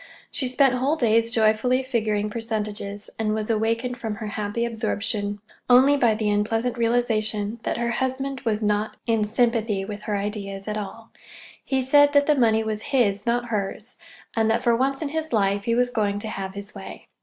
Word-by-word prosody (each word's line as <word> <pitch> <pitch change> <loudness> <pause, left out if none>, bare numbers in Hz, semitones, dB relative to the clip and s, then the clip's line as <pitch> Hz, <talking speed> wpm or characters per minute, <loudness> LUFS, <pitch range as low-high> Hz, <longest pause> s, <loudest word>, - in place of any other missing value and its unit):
She 260 - -1
spent 260 +1 +3
whole 265 +5 +1
days 230 -4 +2
joyfully 230 +3 +2
figuring 215 -5 -1
percentages, 210 -3 -4
and 215 -1 0
was 220 +1 -1
awakened 230 +3 0
from 220 -4 -4
her 215 0 -5
happy 210 +2 -2
absorption 210 -2 -2 0.3
only 260 +3 +7
by 235 -6 +3
the 215 -1 0
unpleasant 225 +3 0
realization 225 -2 0
that - - -2
her 235 0 -1
husband 265 +1 -2
was 220 -4 -1
not 210 +1 0
in 225 -2 +2
sympathy 220 -3 +1
with 210 0 -7
her 210 - -1
ideas 200 -1 -4
at 210 - -2
all. 215 +2 -7 0.5
He 265 -1 0
said 290 +2 +5
that 285 0 +5
the 300 - +4
money 225 -5 +3
was 215 -1 -3
his, 230 -7 +1
not 240 0 0
hers, 210 +2 -4 0.4
and 225 -1 +2
that, 230 +2 +1
for 235 -2 +4
once 270 +4 0
in 295 - -2
his 315 +1 -3
life, 200 -2 +1
he 230 - +1
was 245 0 +2
going 205 -4 0
to 215 +1 -4
have 195 -2 -5
his 200 +1 -7
way. 195 -2 -10
225 Hz, 190 wpm, -24 LUFS, 210-245 Hz, 0.5 s, only